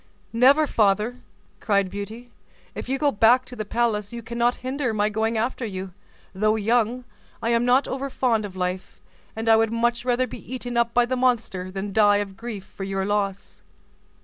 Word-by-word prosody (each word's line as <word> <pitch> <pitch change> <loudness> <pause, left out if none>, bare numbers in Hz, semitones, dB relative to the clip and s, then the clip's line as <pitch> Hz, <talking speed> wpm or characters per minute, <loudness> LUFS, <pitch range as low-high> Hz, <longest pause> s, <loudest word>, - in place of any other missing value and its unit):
"Never, 270 +6 +5
father!" 215 0 +1 0.4
cried 200 -3 +1
Beauty; 220 +4 -7 0.4
"if - - -7
you 270 - 0
go 290 0 +2
back 240 +4 +4
to 250 - -11
the 215 - -3
palace, 210 -2 0
you 235 -1 -7
cannot 235 +2 0
hinder 260 -3 -1
my 210 0 +2
going 220 +2 -1
after 240 +3 -1
you; 190 -4 -5 0.4
though 215 +3 +2
young, 230 +3 +1 0.4
I 230 - -1
am 235 0 +2
not 255 +3 +3
over 275 +1 -3
fond 240 -4 +1
of 200 -2 -7
life; 185 0 -4 0.4
and 225 +1 -4
I 225 - +7
would 225 0 +2
much 235 +1 0
rather 250 0 +1
be 250 - -9
eaten 245 -1 -5
up 235 0 +1
by 245 0 +5
the 255 +1 -1
monster, 235 -7 0
than 195 +1 -5
die 205 -1 +5
of 200 -1 -4
grief 220 -3 -7
for 195 - -9
your 195 0 -2
loss." 200 -1 -2
225 Hz, 190 wpm, -24 LUFS, 205-245 Hz, 0.4 s, I